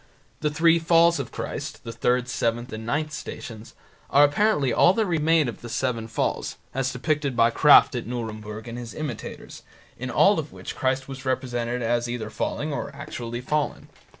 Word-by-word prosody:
The 150 - 0
three 165 +2 +4
falls 170 0 +4
of 135 - -4
Christ - - -5
(third, 125 +2 0
seventh, 120 0 -2
and 110 +1 -6
ninth 150 +4 -1
Stations) 110 -1 -8 0.3
are 145 - +6
apparently 145 - +3
all 180 - +5
that 220 +1 +1
remain 160 -3 +2
of 120 - -6
the 120 - -8
Seven 115 -1 -1
Falls, 115 - -2 0.2
as 130 0 -1
depicted 140 +1 -1
by 115 0 +4
Krafft 150 +3 +7
at 120 -3 -4
Nuremburg 110 -2 -5
and 120 +1 -6
his 120 -2 -8
imitators, 150 -8 -6 0.4
in - - -4
all - - +4
of - - -5
which - - -8
Christ 130 0 0
was 135 -1 -8
represented 125 -2 -2
as 120 +1 0
either 115 -3 -4
falling 150 +6 -2
or - - -3
actually 120 -4 -6
fallen. 150 +3 -2
125 Hz, 175 wpm, -25 LUFS, 120-150 Hz, 0.4 s, Krafft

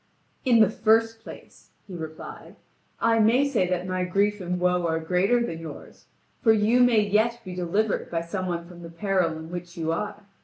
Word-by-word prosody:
"In 235 -3 +5
the 215 - +6
first 225 +1 +2
place," - - -13 0.2
he 190 - -11
replied, 160 -2 -8 0.4
"I 230 0 +3
may 240 +6 +4
say 225 -10 +1
that 180 0 -1
my 185 0 -1
grief 200 +3 0
and 180 0 -2
woe 180 0 +1
are 160 0 0
greater 190 +9 +1
than 165 -7 -5
yours, 160 -3 -11 0.3
for 225 - +5
you 220 +3 +3
may 245 -3 +5
yet 215 +3 +1
be 185 - -6
delivered 185 +4 -1
by 165 -1 -1
some 185 +3 -4
one 170 -1 -3
from 175 -1 -12
the 170 - -9
peril 175 -2 0
in 160 +1 -9
which 175 -1 -7
you 165 -1 -1
are. 205 +4 -4
185 Hz, 195 wpm, -25 LUFS, 175-220 Hz, 0.4 s, the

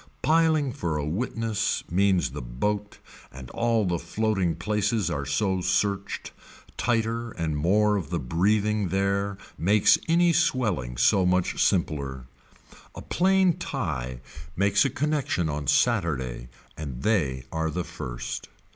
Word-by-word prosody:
Piling 155 -4 +3
for 85 - -2
a 75 - -2
witness 110 +4 -1
means 90 -7 +2
the 75 - -6
boat 105 +13 -3 0.3
and 65 -1 -10
all 115 -2 +1
the 85 -2 0
floating 95 -1 0
places 105 +1 0
are 70 -3 -3
so 95 +6 0
searched, 100 +2 -1 0.4
tighter 115 0 0
and 80 -2 -2
more 105 +7 +3
of 85 -7 -5
the 85 - -1
breathing 100 - +1
there 100 +1 0 0.2
makes 100 +4 +4
any 170 +1 +4
swelling 105 - 0
so 90 +11 +4
much 90 0 +1
simpler. 70 -8 -1 0.7
A - - -8
plain 185 -1 +2
tie 70 - -4 0.3
makes 100 +1 +3
a - - +2
connection 140 - -1
on 75 -1 -4
Saturday 65 -8 +1 0.3
and 70 -5 -6
they 75 -12 +1
are 80 0 -1
the 90 +3 -2
first. - - -6
95 Hz, 130 wpm, -26 LUFS, 75-110 Hz, 0.7 s, makes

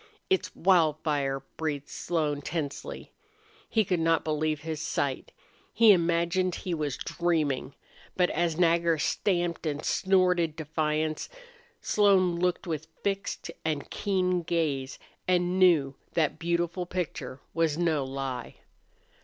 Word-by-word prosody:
"It's 380 - +2
Wildfire!" 155 -6 +2 0.2
breathed 145 -3 -2
Slone, 150 -4 -1
tensely. 145 -2 -5 0.6
He 220 -2 +2
could 180 -2 0
not 165 0 +2
believe 155 -1 -1
his 160 -1 -4
sight. 140 -4 -2 0.4
He 225 -1 +7
imagined 175 +1 +2
he 180 - -4
was 150 -4 -2
dreaming. 155 -6 -1 0.4
But 180 -1 +3
as 170 -1 0
Nagger 170 -1 +3
stamped 175 +1 0
and 145 -1 -3
snorted 180 -4 +2
defiance 155 0 -1 0.5
Slone 190 -4 +3
looked 180 0 0
with 160 -2 -4 0.2
fixed 200 0 -2
and 155 -3 -2
keen 185 -3 0
gaze, 155 -6 -1 0.3
and 180 0 +2
knew 160 -7 +5 0.2
that 160 -3 +1
beautiful 170 +1 -1
picture 175 -7 -4
was 160 -2 +1
no 165 -5 +1
lie. 130 -3 -5
165 Hz, 120 wpm, -28 LUFS, 150-180 Hz, 0.6 s, He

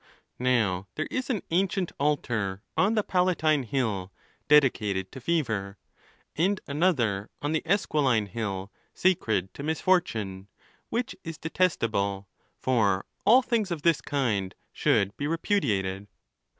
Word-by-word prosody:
Now 110 -7 +1
there 155 - -1
is 260 +1 -2
an 225 -7 -1
ancient 185 +1 +1
altar 115 -9 -1
on 205 +4 +3
the 215 - +2
Palatine 180 -6 +2
hill 110 -7 -2 0.4
dedicated 105 -10 +3
to 130 - -9
Fever, 110 -11 -1 0.6
and 185 +5 +1
another 135 - +1
on 145 - -2
the 160 - +1
Esquiline 145 - +2
hill 100 -2 -4 0.2
sacred 110 - +1
to - - -8
Misfortune, 140 - 0 0.4
which 235 +1 -2
is 165 -1 -6
detestable, 110 - 0 0.3
for 105 -7 +1 0.2
all 250 +4 +7
things 225 -6 0
of 165 -4 -4
this 170 -3 +3
kind 110 -10 -1 0.2
should 100 +1 +2
be 145 - -2
repudiated. 105 - 0
135 Hz, 125 wpm, -27 LUFS, -, 0.6 s, all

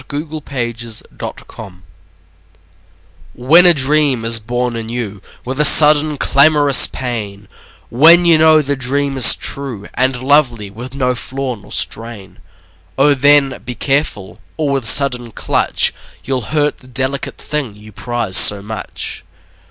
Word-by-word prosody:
Y 145 - -5
Z 150 - -5
A 155 - -7
Pinch 120 -5 -6
of 115 -1 -3 0.3
Salt 105 -3 -10 1.6
WHEN 160 +9 +3
a 175 - +6
dream 140 -3 0
is 115 0 +3
born 120 +2 -4
in 115 -1 -7
you 110 -5 -6 0.2
With 130 +3 -6
a - - +3
sudden 150 0 +4
clamorous 145 -1 +4
pain, 105 -6 -6 0.4
When 165 +8 +5
you 165 -2 +3
know 155 -1 +3
the 140 0 -3
dream 135 +2 -2
is 130 -3 +8
true 125 -8 -5
And 130 0 -2
lovely, 125 -8 0
with 120 +6 -11
no 125 -2 -1
flaw 130 +1 -6
nor 105 -3 -16
strain, 115 -4 -3 0.6
O 145 +2 +3
then, 140 0 +2
be 125 - -8
careful, 135 -7 -3 0.2
or 150 -3 -2
with 135 -4 -3
sudden 125 -2 +2
clutch - - -1 0.3
You'll 130 -4 -4
hurt 150 -1 -2
the 130 - -19
delicate 130 +2 -4
thing 145 -8 -6
you 105 +1 -15
prize 115 -2 -1
so 100 -1 +7
much. 105 -3 -7
130 Hz, 150 wpm, -14 LUFS, 115-145 Hz, 1.6 s, is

